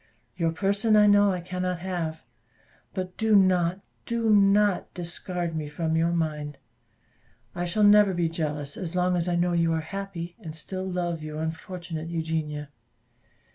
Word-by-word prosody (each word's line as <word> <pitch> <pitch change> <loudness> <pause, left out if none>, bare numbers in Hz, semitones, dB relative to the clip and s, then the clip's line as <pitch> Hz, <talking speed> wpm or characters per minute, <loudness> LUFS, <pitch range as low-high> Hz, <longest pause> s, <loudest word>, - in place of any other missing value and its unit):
Your 165 -2 +1
person 200 +5 +2
I 210 0 +7
know 205 -1 +5
I 180 -1 -2
cannot 180 0 -2
have 170 -4 -3 0.7
but 185 -1 -4
do 220 -1 +3
not, 185 -1 +3 0.3
do 230 -1 +1
not 200 -1 +4
discard 175 -1 -4
me 155 -2 -3
from 160 +1 -1
your 165 +1 +2
mind. 150 -4 -2 1.0
I 175 0 -2
shall 195 +5 +1
never 205 -2 +6
be 170 -1 +1
jealous 150 -3 -3
as 180 -2 -3
long 180 0 +2
as 175 0 0
I 175 - +1
know 175 0 +1
you 165 -1 +2
are 160 - +1
happy, 180 0 -6
and 160 -7 -8
still 185 +4 -4
love 175 -2 -2
your 155 0 -6
unfortunate 160 0 -5
Eugenia. 160 -3 -3
175 Hz, 160 wpm, -26 LUFS, 160-190 Hz, 1.0 s, I